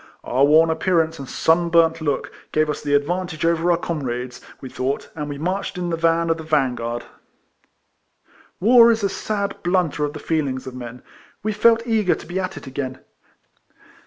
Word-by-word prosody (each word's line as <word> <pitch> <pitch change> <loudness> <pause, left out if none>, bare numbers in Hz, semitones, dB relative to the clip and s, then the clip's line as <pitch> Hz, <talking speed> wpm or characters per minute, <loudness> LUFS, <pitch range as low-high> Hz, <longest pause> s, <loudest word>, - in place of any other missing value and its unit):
Our 130 +3 +1
worn 160 +3 +5
appearance 165 -2 +1
and 135 - -8
sun 170 +1 +2
burnt 165 -1 +3
look 145 -3 -2 0.2
gave 155 0 +1
us - - -6
the 145 -1 +1
advantage 165 +2 -1
over 170 +1 +2
our 170 - +4
comrades, 125 -7 -4 0.2
we 130 - -8
thought, 130 +2 -3
and 150 -2 -4
we 145 - -5
marched 185 +5 -3
in 175 -1 -2
the - - +1
van 165 0 +2
of 165 - 0
the 160 - -7
vansuard. 125 -6 -1 1.6
AYar 235 +3 +7
is 225 -2 -1
a 200 - +2
sad 200 0 -3
blunter 175 -4 0
of 145 0 -2
the 155 - -7
feelings 140 -6 -2
of 130 - -7
men. 125 -1 -9 0.4
We 215 0 -1
felt 230 +2 +4
eager 220 -6 +2
to - - -11
be 180 +2 -3
at 185 0 -4
it - - -9
again. 130 -1 -5
160 Hz, 185 wpm, -21 LUFS, 140-180 Hz, 1.6 s, AYar